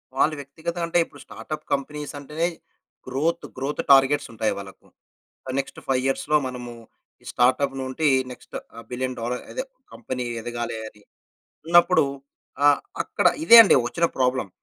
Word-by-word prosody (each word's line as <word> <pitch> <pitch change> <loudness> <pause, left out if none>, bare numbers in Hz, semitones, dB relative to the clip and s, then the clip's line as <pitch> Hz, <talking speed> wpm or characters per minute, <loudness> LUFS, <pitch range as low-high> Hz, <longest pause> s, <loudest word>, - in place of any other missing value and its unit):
వాళ్ళు 155 +3 +2
వ్యక్తిగతంగా 165 +5 -5
అంటే, 170 +1 +2
ఇప్పుడు - - -16
స్టార్ట్‌అప్ 155 - -7
కంపెనీస్ 150 +2 -4
అంటేనే 155 +4 -2 0.6
గ్రోత్, 160 +6 -1
గ్రోత్ 135 +3 -2
టార్గెట్స్ 135 +1 +5
ఉంటాయి 110 -1 0
వాళ్ళకు. 100 -1 -11 0.7
నెక్స్ట్ 135 - -4
5 130 -1 +1
ఇయర్స్‌లో 150 +3 +1
మనము 125 -1 -6 0.6
స్టార్ట్‌అప్ 135 +2 +2
నుండి 130 +4 0 0.2
నెక్స్ట్ 125 - -13 0.4
బిలియన్ 130 +1 -3
డాలర్ 125 +2 -3
అదే 260 - -3 0.3
కంపెనీ 125 +2 -5 0.2
ఎదగాలి 120 0 -4
అని, 105 -1 -20 0.7
ఉన్నప్పుడు 175 +1 +5 0.6
ఆహ్, 145 -1 +6 0.2
అక్కడ - - +1 0.2
ఇదే 235 -7 +9
అండి 200 - +5
వచ్చిన 170 +6 +1
ప్రాబ్లమ్. 125 -5 +1
135 Hz, 130 wpm, -24 LUFS, 125-155 Hz, 0.7 s, ఇదే